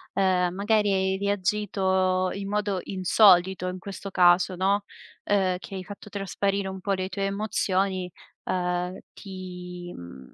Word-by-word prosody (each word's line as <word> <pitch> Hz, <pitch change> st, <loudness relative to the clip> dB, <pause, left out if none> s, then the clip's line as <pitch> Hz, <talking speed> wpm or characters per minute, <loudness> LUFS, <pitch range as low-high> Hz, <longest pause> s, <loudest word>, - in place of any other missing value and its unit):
ehm, 180 Hz, -2 st, +2 dB
magari 205 Hz, +1 st, +2 dB
hai 190 Hz, 0 st, +1 dB
reagito 190 Hz, -2 st, +1 dB
in 200 Hz, 0 st, -5 dB
modo 205 Hz, -2 st, 0 dB
insolito 185 Hz, -1 st, +4 dB
in 185 Hz, 0 st, -6 dB
questo 195 Hz, +1 st, -7 dB
caso 180 Hz, +1 st, +4 dB
no, 200 Hz, +2 st, +2 dB, 0.4 s
ehm, 190 Hz, -3 st, +1 dB
che 195 Hz, -, -9 dB
hai 190 Hz, -, -5 dB
fatto 205 Hz, +1 st, -10 dB
trasparire 200 Hz, 0 st, -1 dB
un 190 Hz, 0 st, -6 dB
po' 200 Hz, -, -2 dB
le 185 Hz, -1 st, 0 dB
tue 200 Hz, +1 st, -4 dB
emozioni, 195 Hz, -2 st, -1 dB, 0.3 s
ehm, 180 Hz, 0 st, -1 dB, 0.2 s
ti 180 Hz, -2 st, -8 dB
mhmm, 65 Hz, -7 st, -11 dB
190 Hz, 140 wpm, -26 LUFS, 180-200 Hz, 0.4 s, insolito